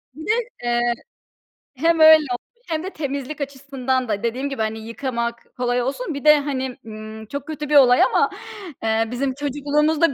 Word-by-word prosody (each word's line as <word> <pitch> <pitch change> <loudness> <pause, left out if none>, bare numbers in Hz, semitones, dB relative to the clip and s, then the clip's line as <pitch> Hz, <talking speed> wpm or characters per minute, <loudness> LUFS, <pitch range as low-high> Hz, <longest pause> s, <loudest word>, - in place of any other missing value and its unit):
bir 315 +2 -9
de, 425 - +2 0.3
eee, 240 0 +1 0.9
hem 330 +4 +2
öyle 315 0 +10 0.2
olmuş 475 - -8
hem 320 +1 -1
de 380 - -4
temizlik 285 -2 -5
açısından 265 -2 -2
da 205 0 -1
dediğim 255 +4 -1
gibi, 270 -5 -4
hani, 220 0 -2
yıkamak 235 0 -4
kolay 245 0 +1
olsun, 290 - -3
bir 280 +2 -6
de, 300 -1 +8
hani, 265 -2 -3
ımm, 215 0 -8
çok 280 +5 -6
kötü 300 -2 -5
bir 300 - +2
olay 250 -3 +7
ama, - - +3 0.5
eee, 225 0 +1
bizim 260 +1 -1
çocukluğumuzda 290 +2 +1
270 Hz, 170 wpm, -22 LUFS, 240-300 Hz, 0.9 s, öyle